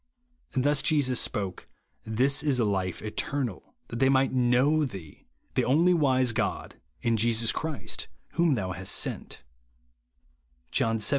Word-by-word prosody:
Thus 145 +3 +2
Jesus 140 -6 +2
spoke, 95 -3 -3 0.2
" - - -46 0.2
This 140 +2 +4
is 140 -4 +1
life 95 -5 -1
eternal, 120 +1 -4
that 115 - -5
they 135 0 +4
might 135 0 +3
know 130 +5 +3
thee, 95 - -8 0.3
the - - +1
only 165 +7 +4
wise 130 -6 +3
God, 115 - -3 0.3
and 115 -1 +1
Jesus 115 0 +2
Christ 160 -3 -5 0.2
whom 170 -4 +2
thou 95 -5 -3
hast 95 +1 -2
sent," - - -3 1.3
(John 115 0 +1
xvii. 105 - +1
125 Hz, 140 wpm, -27 LUFS, 110-140 Hz, 1.3 s, This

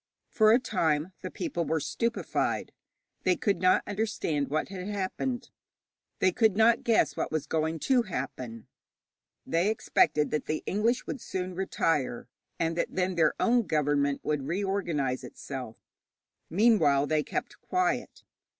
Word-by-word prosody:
For 215 -1 +5
a 230 - +7
time 165 - 0
the 185 - -5
people 270 - -3
were 160 0 0
stupefied. 230 - -1 0.5
They 185 - +3
could 195 -2 0
not 185 0 +4
understand 200 -9 -1
what 155 +5 -1
had 190 -1 -6
happened; 235 +5 -3 0.7
they 185 - +3
could 215 0 +2
not 230 +1 +4
guess 230 -2 +3
what - - -2
was 155 -2 -1
going 160 0 -1
to 260 -2 +3
happen. 125 - -5 0.8
They 170 +5 +1
expected 150 -8 +2
that 150 - -2
the 155 - -2
English 230 +5 +1
would 265 - -5
soon 185 0 -4
retire, 155 -10 -1 0.3
and 165 0 0
that - - -2
then 185 0 +1
their 160 -3 +3
own 235 -3 +3
government 145 -2 +1
would 150 -3 -1
reorganize 170 -8 -1
itself. 125 -2 -7 0.7
Meanwhile 175 -8 +4
they 155 +1 +1
kept - - -5
quiet. 365 0 -1
180 Hz, 140 wpm, -28 LUFS, 150-215 Hz, 0.8 s, a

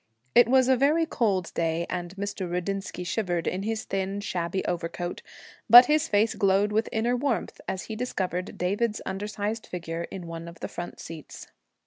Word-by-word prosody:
It 240 - +7
was 260 0 +5
a 260 - +5
very 295 +6 +3
cold 200 - 0
day, 165 0 0
and 175 +1 -4
Mr. 200 -2 -4
Rudinsky 180 +1 -3
shivered 175 -3 -1
in 185 - -1
his 220 +1 -2
thin, 195 +1 -2
shabby 180 -2 -2
overcoat; 175 0 -3 0.5
but 240 +3 +12
his 305 +3 +2
face 215 +2 +2
glowed 200 +1 +2
with 220 +2 +1
inner 235 +2 +1
warmth 245 -6 -2
as 190 - -3
he 220 - -6
discovered 185 -6 -3
David's 210 +5 0
undersized 210 +2 -3
figure 170 -1 -4
in 185 -3 -7
one 165 0 -7
of 170 0 -11
the - - -4
front 175 - -7
seats. 160 -3 -9
195 Hz, 170 wpm, -27 LUFS, 175-225 Hz, 0.5 s, but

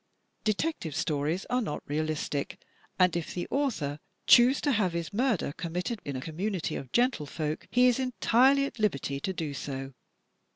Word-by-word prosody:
Detective 215 - -1
Stories 155 +5 -1
are 250 0 +2
not 175 -10 -4
realistic, 150 -1 -2 0.4
and 180 -2 +4
if 170 -2 -3
the 175 - -3
author 190 - -1 0.3
choose 250 +3 +7
to 290 - +2
have 205 -8 +1
his 170 +3 -4
murder 230 - +1
committed 180 +7 -3
in 140 - -4
a 130 - -3
community 175 +5 -3
of 130 - -6
gentle 240 - +2
folk, 155 0 -4
he 250 0 +4
is 250 0 +4
entirely 260 +2 +3
at 260 - -7
liberty 140 -9 0
to 190 - -2
do 160 -5 -4
so. 135 0 -5
180 Hz, 165 wpm, -29 LUFS, 150-240 Hz, 0.4 s, choose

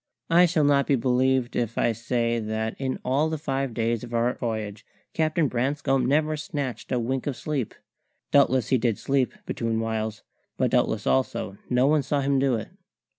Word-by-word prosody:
I 175 +2 +6
shall 160 -2 +1
not 140 -1 +3
be 140 - +4
believed 130 0 +1
if 115 -2 -1
I - - +3
say 115 +1 -1
that 110 0 -2
in 130 -1 -2
all 140 +5 +2
the 160 - -2
five 135 -3 -2
days 115 -1 0
of 120 - -6
our 120 +2 +2
voyage 110 -3 -4 0.3
Captain 155 0 +1
Branscome 135 +1 0
never 155 +3 +2
snatched 140 -5 -5
a 125 - +2
wink 130 +3 -2
of 140 - -1
sleep. 145 -7 -3 0.6
Doubtless 130 -4 +4
he 130 - +3
did 115 -2 +1
sleep, 135 -2 +1
between 115 -1 -2
whiles; 110 -1 -3 0.3
but - - +1
doubtless - - +1
also 65 +9 0
no 125 +1 +3
one 150 +1 +4
saw 140 +1 -1
him 140 0 +2
do 135 -2 +2
it. 110 - -5
130 Hz, 180 wpm, -25 LUFS, 115-140 Hz, 0.6 s, I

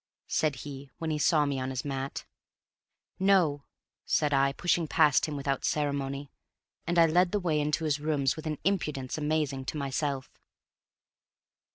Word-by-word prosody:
said 155 -3 0
he, 140 -1 -8
when 160 -1 -3
he 150 - -1
saw 150 -1 +4
me 140 -2 -1
on 130 0 -2
his 130 0 -4
mat. 135 -1 -4 0.9
"No," 180 -7 +3 0.4
said 150 -2 +1
I, 135 0 +3
pushing 170 +2 0
past 150 -2 +4
him 150 - -4
without 140 -1 -2
ceremony. 140 -2 -1 0.6
And 175 +1 0
I 165 - +8
led 175 +2 +3
the 210 - +1
way 165 -5 0
into 150 +2 0
his 150 -1 +1
room 150 -2 -1
with 160 0 -7
an 155 -1 -2
impudence 150 -8 -1
amazing 150 -3 -1
to 150 - -4
myself. 140 -1 -3
150 Hz, 160 wpm, -29 LUFS, 140-160 Hz, 0.9 s, I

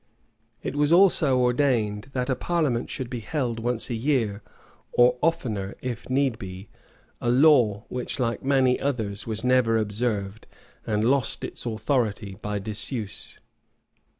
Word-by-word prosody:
It - - -4
was 145 +1 +2
also 170 -7 +5
ordained 125 -4 +1
that 125 -1 -1
a 130 - +1
parliament 145 -5 -1
should 130 - -4
be 120 0 -5
held 120 -1 -2
once 120 0 -1
a 125 - -3
year, 115 -4 0 0.5
or 125 +1 +5
oftener, 115 -12 -1
if 125 -2 -5
need 130 -3 +1
be; 95 +1 -8 0.5
a 120 - 0
law 125 -6 +4
which, 125 +2 -4
like 120 -2 -1
many 130 -2 +3
others, 110 -6 -2
was 110 0 -2
never 125 -3 +3
observed 105 -1 -2 0.4
and 105 -1 0
lost 130 0 +1
its - - -5
authority 110 -4 -1
by 105 0 -2
disuse. 105 +1 -2
120 Hz, 140 wpm, -25 LUFS, 110-130 Hz, 0.5 s, also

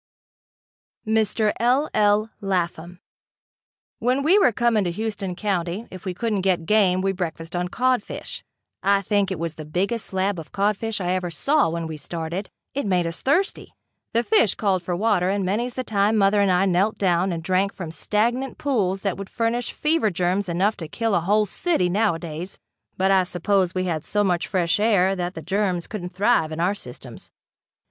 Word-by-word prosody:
Mr. 220 -1 +2
L. 255 +6 +3
L. 210 +1 +2
Lapham. 175 -2 -2 1.0
When 255 +3 +1
we 360 +8 +5
were 320 - +5
coming 230 -2 +2
to - - 0
Houston 200 -1 -4
County, 190 +1 -2
if 185 -2 -10
we 185 -2 -3
couldn't 215 -1 -1
get 180 -3 +1
game 185 -2 +3
we 195 0 +1
breakfasted 170 -2 -5
on 175 0 -1
codfish. 250 +3 -2 0.4
I 200 0 +2
think 200 -1 +1
it 190 - -3
was 165 0 -3
the 155 - -8
biggest 195 +9 -1
slab 190 -1 -1
of 160 - -10
codfish 210 +2 0
I 180 -1 -1
ever 180 -1 -1
saw 275 - +2
when 165 0 -3
we 160 -1 -6
started. 170 +5 -5 0.2
It 280 -5 -2
made 180 -3 +2
us 165 0 -4
thirsty. 345 +9 0 0.4
The 235 +1 +2
fish 220 -2 +3
called 195 -4 +1
for 175 0 -3
water 185 -2 +2
and 195 -1 0
many's 235 +6 -1
the 255 - -2
time 210 -1 +1
mother 200 0 +4
and 200 - +3
I 180 +2 +3
knelt 195 +3 +1
down 185 -1 +1
and 165 -1 -4
drank 190 +3 +1
from 170 -5 -7
stagnant 235 - -1
pools 200 -9 0
that 195 -3 -2
would 195 -1 -7
furnish 235 +1 -1
fever 305 -7 +1
germs 185 +2 -1
enough 190 +5 +1
to 165 -5 -6
kill 225 +7 -1
a 195 - +4
whole 205 +5 +2
city 205 - 0
nowadays, 175 -3 -1 0.4
but 190 +1 +2
I 190 -1 +5
suppose 185 +1 0
we 185 - 0
had 165 -4 -2
so 205 0 0
much 175 -3 0
fresh 185 0 +1
air 195 -3 +3
that 180 0 -3
the 160 - -7
germs 185 -1 0
couldn't 180 -4 -7
thrive 190 -5 +2
in 155 - -5
our 180 +4 +2
systems. 125 -12 -11
195 Hz, 185 wpm, -23 LUFS, 175-215 Hz, 1.0 s, we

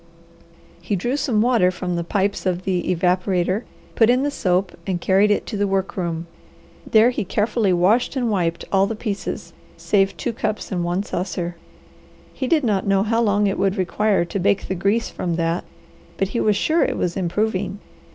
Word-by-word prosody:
He 190 +4 -1
drew 240 +8 -1
some 260 -7 +1
water 235 -7 +3
from 180 -1 -3
the 170 - -1
pipes 195 +2 -1
of 180 0 -1
the 185 -2 0
evaporator, 185 +3 +1 0.3
put 225 -1 +4
in 250 +2 +3
the 290 - 0
soap, 185 -6 0
and 185 -2 -1
carried 195 +4 +3
it 205 - +1
to 215 - -4
the 205 0 +1
work 195 0 -1
room. 170 -3 -3 0.6
There 225 +2 +5
he 245 - -2
carefully 210 +1 0
washed 195 +10 +2
and 245 -4 0
wiped 170 -4 -1
all 195 0 +3
the 225 - -3
pieces, 205 -3 -5 0.2
save 195 -1 +1
two 240 - -2
cups 215 -1 -3
and 180 -2 -1
one 175 +3 -1
saucer. 175 -2 -3 0.8
He 260 - -3
did 310 +1 +2
not 205 -4 0
know 195 0 +3
how 225 +2 +1
long 205 -2 +2
it 195 - 0
would 195 +1 +1
require 195 0 +1
to 195 - -4
bake 195 +2 +1
the - - -1
grease 200 +5 0
from 175 -2 -2
that, 165 +1 -1 0.5
but 195 - 0
he 235 - -2
was 210 -1 +2
sure 315 +10 +2
it - - -1
was 175 -1 -1
improving. 195 +1 -1
195 Hz, 190 wpm, -21 LUFS, 180-215 Hz, 0.8 s, There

